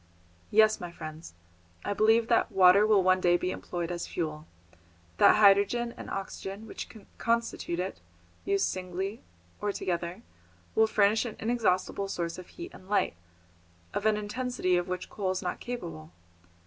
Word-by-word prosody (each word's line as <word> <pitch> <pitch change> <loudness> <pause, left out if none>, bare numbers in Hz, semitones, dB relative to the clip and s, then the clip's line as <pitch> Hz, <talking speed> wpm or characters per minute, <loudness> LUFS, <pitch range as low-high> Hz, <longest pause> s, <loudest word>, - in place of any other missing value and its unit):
Yes, 215 0 +5
my 175 -1 -6
friends, 155 - -9 0.5
I - - 0
believe 225 +2 +4
that 235 0 +2
water 195 +2 +6
will 205 -3 +5
one 185 0 +3
day 175 -1 +4
be 180 +1 -2
employed 175 -2 -4
as 175 -1 -4
fuel, 155 -2 -4 0.7
that - - +7
hydrogen 210 +3 +4
and - - -8
oxygen 195 +1 -5
which - - -7 0.3
constitute 230 -7 -1
it, 185 +1 -3 0.4
used 395 0 +1
singly 185 +3 -4 0.4
or 205 - 0
together, 175 +2 -3 0.5
will 220 - +4
furnish 215 0 +3
an 230 - -5
inexhaustible 205 -4 0
source 170 -2 -3
of 185 - -10
heat 350 +1 -9
and 185 - -14
light, 205 - +2 0.8
of - - 0
an 215 -1 +3
intensity 210 -3 -1
of 175 +1 0
which 180 0 -4
coal 195 -3 -3
is 185 +1 -2
not 180 - -3
capable. 80 - -6
195 Hz, 155 wpm, -29 LUFS, 180-220 Hz, 0.8 s, that